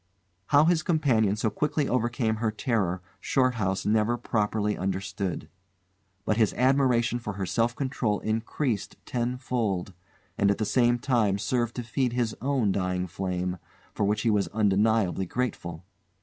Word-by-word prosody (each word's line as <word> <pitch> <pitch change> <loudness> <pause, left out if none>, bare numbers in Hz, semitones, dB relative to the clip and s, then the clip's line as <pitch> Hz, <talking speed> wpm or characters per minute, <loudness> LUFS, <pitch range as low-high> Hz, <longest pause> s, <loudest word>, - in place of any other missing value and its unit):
How 145 +1 +5
his 170 -1 +3
companion 130 - +2
so 110 0 -1
quickly 150 +5 0
overcame 120 -2 0
her 110 0 0
terror, 105 -6 -1 0.2
Shorthouse 115 -6 0
never 110 +2 +2
properly 105 -2 0
understood; 95 -2 -3 0.8
but 110 - +1
his 110 -3 +2
admiration 125 -2 +2
for 105 -3 -5
her 95 0 -3
self 115 +5 0
control 125 -6 -1
increased 110 +1 -2
tenfold, 120 -6 -2 0.5
and 100 - +4
at 100 - +2
the 110 - -1
same 120 +2 +3
time 115 -6 +1
served 120 +3 -1
to 125 - -3
feed 120 +2 -1
his 120 -3 0
own 130 -6 +1
dying 90 -1 -1
flame 90 0 -3 0.3
for - - -1
which 105 +1 +1
he 115 - +3
was 105 -2 +1
undeniably 105 -2 +1
grateful. 85 -8 -3
110 Hz, 145 wpm, -27 LUFS, 100-125 Hz, 0.8 s, How